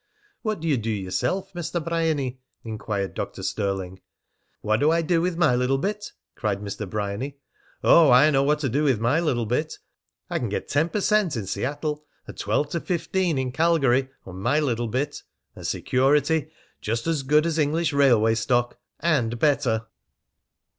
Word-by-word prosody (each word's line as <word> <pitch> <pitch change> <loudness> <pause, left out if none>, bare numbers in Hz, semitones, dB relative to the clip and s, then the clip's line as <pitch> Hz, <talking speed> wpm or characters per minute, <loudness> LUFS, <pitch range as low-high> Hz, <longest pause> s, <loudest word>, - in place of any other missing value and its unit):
"What 215 -7 -2
d'ye 160 -4 +1
do 115 0 -3
yeself, 110 - -2
Mr. 175 0 -3
Bryany?" 160 -6 -1 0.2
inquired 105 -3 -4
Dr. - - -5
Stirling. 95 -3 -3 0.6
"What 110 +1 +1
do 150 - +3
I 165 +1 +2
do 165 0 +2
with 175 -1 -1
my 150 -8 +3
little 125 +2 +1
bit?" 205 +7 -3 0.2
cried 105 -4 -2
Mr. 100 0 -6
Bryany. 105 +7 -3 0.5
"Oh, 165 -4 +7
I 130 +5 +6
know 135 -2 +3
what 150 +2 +2
to 140 - 0
do 140 +6 0
with 135 -7 +2
my 120 +8 +2
little 130 -9 0
bit. 150 +8 -2 0.5
I - - -2
can - - -2
get - - -3
ten 155 +4 +1
per 210 - -2
cent. 210 - +2
in 105 - -3
Seattle, 145 - -3 0.2
and - - -10
twelve 145 0 -1
to 170 - -1
fifteen 180 -1 -1
in 130 -1 -1
Calgary, 135 -4 +2 0.2
on 95 0 -9
my 135 +9 +2
little 120 -5 -1
bit; 135 +6 -2 0.3
and - - -6
security 145 +4 +1 0.3
just 115 +2 -2
as 165 -3 0
good 150 +3 +3
as 165 -1 0
English 155 +1 +1
railway 120 -6 +4
stock 120 +1 0 0.2
and 125 -9 +1
better." 115 -5 +1
140 Hz, 170 wpm, -24 LUFS, 115-160 Hz, 0.6 s, Oh